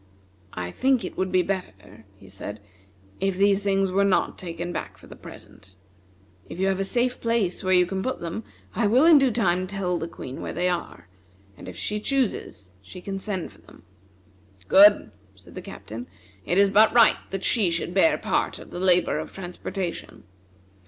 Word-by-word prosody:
"I 90 -1 -4
think 260 - +1
it - - -7
would 185 0 -2
be 185 -1 +3
better," 110 - -6
he 100 - -17
said, 100 +2 -8 0.6
"if 195 -1 -1
these 200 0 +3
things 195 -1 +1
were 195 +2 +2
not 200 -2 +1
taken 175 0 -6
back - - -6
for - - -17
the - - -12
present. 95 -1 -13 0.7
If 170 - -8
you 190 - +1
have 190 0 -1
a - - +1
safe 245 +5 -1
place 230 -6 0
where 185 0 +3
you 180 0 +5
can 190 +1 -4
put 260 +6 -3
them, 170 +6 -5 0.3
I 225 -2 +1
will 250 +8 +4
in 325 -3 +8
due 270 -1 +3
time 185 -5 0
tell 185 -3 -2
the 165 - -4
Queen 135 -5 -8
where - - -5
they 175 +2 0
are, 175 - -5 0.5
and - - -10
if 90 - -10
she 210 - -3
chooses 215 - -2
she 95 - -11
can 195 +1 -5
send 190 -4 -4
for - - -21
them." - - -18 0.8
"Good!" 200 - +6 0.2
said 95 - -17
the - - -7
Captain, 115 +3 -9 0.4
"it 175 - +1
is 200 0 +4
but 215 +2 +5
right 235 -2 +6
that 195 -1 -5
she 215 -7 +2
should 170 +1 -2
bear 260 - +4
part - - -1
of - - -13
the - - -6
labor 180 -1 +2
of - - -7
transportation. 180 0 -6
190 Hz, 195 wpm, -24 LUFS, 170-205 Hz, 0.8 s, in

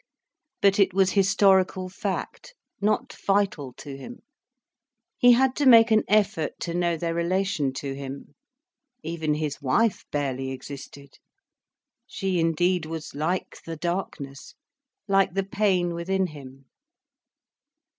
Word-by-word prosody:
But 200 0 +4
it 190 -2 +3
was 190 -1 +3
historical 190 -2 +3
fact, 200 - -5 0.3
not 210 +1 0
vital 195 -9 0
to 140 +2 -9
him. 240 - -10 1.0
He 245 0 +7
had 260 +1 +3
to 290 - +2
make 230 -2 +7
an 220 0 +5
effort 205 -6 +1
to 170 - -3
know 175 -1 0
their 165 +1 -2
relation 170 -4 0
to 135 0 -4
him. 140 +1 -8 0.7
Even 160 -2 -2
his 150 -1 -3
wife 185 - +1
barely 135 -2 -2
existed. 140 +1 -10 0.9
She 190 -3 -2
indeed 165 +1 +1
was 160 -1 -6
like 160 +6 -2
the 165 -1 -6
darkness, 155 -6 -5 0.5
like 195 -2 +2
the 195 - +1
pain 190 -3 +1
within 190 +3 -1
him. 135 -4 -11
175 Hz, 125 wpm, -25 LUFS, 150-195 Hz, 1.0 s, He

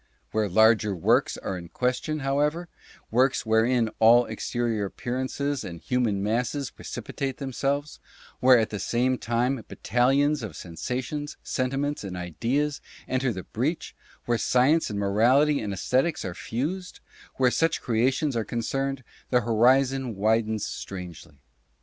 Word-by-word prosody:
Where 110 -2 0
larger 110 0 +4
works 85 - +2
are 95 - -4
in 85 -1 -11
ques 125 +4 0
tion, 155 -1 -3
however 150 +5 0 0.2
— - - -25
works 130 +3 +2
wherein 110 +1 +2
all 120 +2 +6
exterior 115 -5 -2
appearances 130 +6 -3
and 85 -2 -7
human 115 -5 0
masses 125 +5 -1
precipitate 135 +3 -5
themselves 140 +2 -2 0.2
— - - -23
where 130 0 +7
at 110 -2 0
the 105 - -4
same 125 +4 0
time 120 +1 0
battalions 135 +4 +1
of 105 -8 -6
sensations, 125 - -5
sentiments 135 +2 -2
and 95 -2 -5
ideas 125 - -1 0.3
enter 130 -1 0
the 95 -4 -6
breach 145 +9 -3
— - - -28
where 120 -1 +1
science 140 +6 +3
and 105 - -4
morality 120 +9 +3
and 105 -2 -3
esthetics 130 - 0
are 90 - -4
fused 160 - -4 0.2
— - - -23
where 130 -2 +3
such 165 +4 +1
creations 130 +5 +1
are 115 - 0
concerned, 135 +4 -2 0.3
the 125 -1 +3
horizon 125 +2 +2
widens 110 +1 +1
strangely. 90 -6 -8
125 Hz, 145 wpm, -26 LUFS, 110-135 Hz, 0.3 s, where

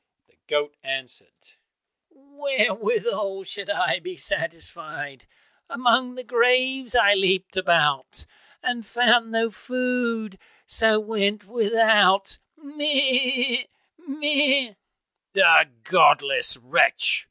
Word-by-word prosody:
The - - -38
goat 145 0 -2
answered, 135 -2 -8 0.6
"Wherewithal 280 - -2
should 200 +4 -8
I 315 - 0
be 365 0 -9
satisfied? 155 - -6 0.4
Among 250 +1 0
the 255 - -9
graves 250 +1 +1
I 205 -4 +5
leapt 190 -1 0
about, 160 -7 0 0.4
And 245 -2 -3
found 235 +1 +2
no 225 0 -1
food, 235 -3 -4 0.3
so 220 -1 +2
went 210 -1 -2
without, 215 -3 +2 0.2
meh! 265 -4 0 0.3
meh!" 285 -5 0 0.6
"The 165 -5 +6
godless 420 - +3
wretch!" - - +1
235 Hz, 90 wpm, -22 LUFS, 195-265 Hz, 0.6 s, The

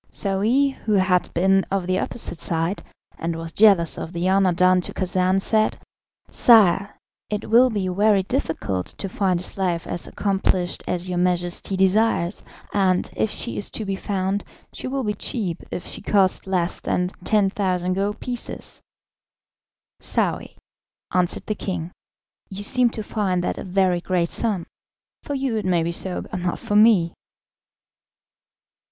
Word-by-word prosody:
Saouy, 220 +8 +1
who 225 -5 -3
had 185 -2 +2
been 190 +2 +3
of 195 -2 -1
the 185 +1 0
opposite 175 -8 -3
side, 165 +5 -1 0.4
and 165 0 -2
was 165 0 -6
jealous 195 -6 +4
of 165 - -6
the 170 +1 -1
honour 190 -1 +3
done 185 +1 +4
to - - -6
Khacan, 185 0 +1
said, 215 +2 +1 0.5
"Sire, 205 -4 +4 0.3
it 210 0 -3
will 250 +3 +6
be 205 -5 -2
very 200 +1 +3
difficult 160 - -2
to 195 - -3
find 185 -2 0
a - - -7
slave 180 -3 -2
as 175 - -4
accomplished 190 -3 0
as 180 0 -2
your 180 -1 -2
Majesty 180 +1 0
desires, 190 -1 +2 0.3
and, 185 -3 +1
if 110 0 0
she 115 - -2
is 105 - +1
to 220 - -4
be 195 -1 -2
found, 195 0 -2 0.3
she - - -6
will 270 +1 -2
be 210 -2 -1
cheap 200 -7 -3
if 180 - -5
she - - -5
cost 195 -2 +2
less 180 -2 0
than 180 0 -1
10,000 190 -3 +1
gold 200 +2 -2
pieces." 245 -1 -4 1.2
"Saouy," - - -1 0.6
answered 180 -1 0
the 215 - -1
king, 180 -5 -4 0.6
"you 200 +1 -5
seem 250 +3 +4
to 220 -1 -5
find 190 -5 -1
that - - -2
a - - -5
very 185 -2 +1
great 175 -2 0
sum. 205 -7 -1 0.6
For 285 - -4
you 265 -4 -1
it 210 - -3
may 175 -3 +2
be 170 - -1
so, 180 +1 -4
but 185 - -6
not 175 -1 -2
for 205 - -3
me." 210 -6 +5
190 Hz, 160 wpm, -23 LUFS, 180-210 Hz, 1.2 s, will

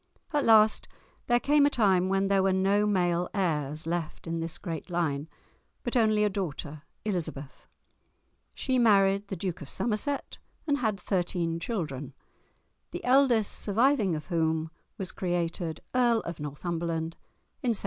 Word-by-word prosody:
At 290 -2 +2
last 220 -1 +5 0.4
there 240 -1 +4
came 285 +2 +4
a - - +3
time 190 -8 +3
when 195 0 +2
there 195 -1 +3
were 190 0 +3
no 200 +2 +2
male 175 -3 +1
heirs 155 -6 -1
left 165 -1 -3
in 165 0 -2
this 165 0 -3
great 165 -1 -6
line, 160 -4 -1 0.5
but 240 - -3
only 215 -3 +4
a - - +4
daughter, 155 -6 -4 0.2
Elizabeth. 160 -8 -4 0.9
She 260 -2 0
married 200 -3 +4
the 195 - -4
Duke 180 0 -4
of 145 - -8
Somerset, 240 +5 -2 0.3
and 290 -2 +1
had 215 -5 0
thirteen 175 -4 -1
children, 150 - -4 0.7
the - - -7
eldest 250 -5 +4
surviving 220 - +2
of 150 - -5
whom 160 -2 0 0.3
was 190 -2 -5
created 170 -2 -2
Earl 240 -3 +3
of 170 -1 -6
Northumberland 165 +2 -3 0.5
in 240 -5 +1
1748. - - 0
190 Hz, 150 wpm, -28 LUFS, 165-215 Hz, 0.9 s, last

